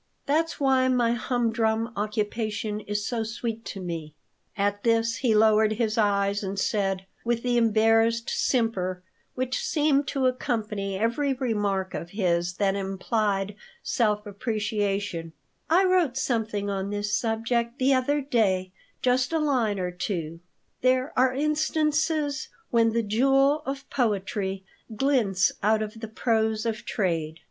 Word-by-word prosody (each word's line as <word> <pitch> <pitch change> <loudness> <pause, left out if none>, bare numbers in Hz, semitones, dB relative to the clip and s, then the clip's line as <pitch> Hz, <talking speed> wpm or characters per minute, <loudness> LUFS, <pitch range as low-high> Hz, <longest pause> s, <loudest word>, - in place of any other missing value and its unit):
That's 320 +4 0
why 265 -2 +3
my 245 -2 +2
humdrum 230 -1 0
occupation 210 0 -2
is 205 -1 -3
so 235 -2 -1
sweet 225 0 -4
to 195 - -6
me." 165 -4 -5 0.4
At 205 0 0
this 230 0 +2
he 240 -5 +2
lowered 215 0 +4
his 220 -1 -1
eyes 200 -2 +1
and 195 -1 -4
said, 195 -1 0 0.2
with 235 0 -1
the 245 -1 +1
embarrassed 225 0 +3
simper 185 -7 0 0.3
which 255 0 -2
seemed 290 -2 +2
to 265 -1 0
accompany 210 -6 -1
every 235 +7 +1
remark 205 -7 -1
of 170 - -5
his 175 -3 +1
that 195 0 +1
implied 195 +1 -1 0.3
self 210 -4 +1
appreciation, 205 -5 -2 0.4
"I 350 +4 +5
wrote 355 -9 +2
something 220 -5 -1
on 195 -1 -2
this 205 0 -1
subject 235 +1 -1
the 270 0 +3
other 285 +3 +1
day, 195 -9 +1 0.3
just 255 +1 +2
a 325 - +1
line 255 -9 +1
or 180 -1 -2
two: 165 -3 -4 0.4
'There 255 +2 +2
are 255 0 +4
instances 305 0 0 0.2
when 230 -1 +3
the 230 0 +1
jewel 270 +7 +3
of 275 0 -4
poetry 195 -5 -1 0.3
glints 220 -8 +2
out 215 +1 +2
of 215 +1 -7
the 225 - -6
prose 220 0 0
of 225 -1 -3
trade.'" 165 -6 -1
220 Hz, 135 wpm, -26 LUFS, 200-255 Hz, 0.4 s, I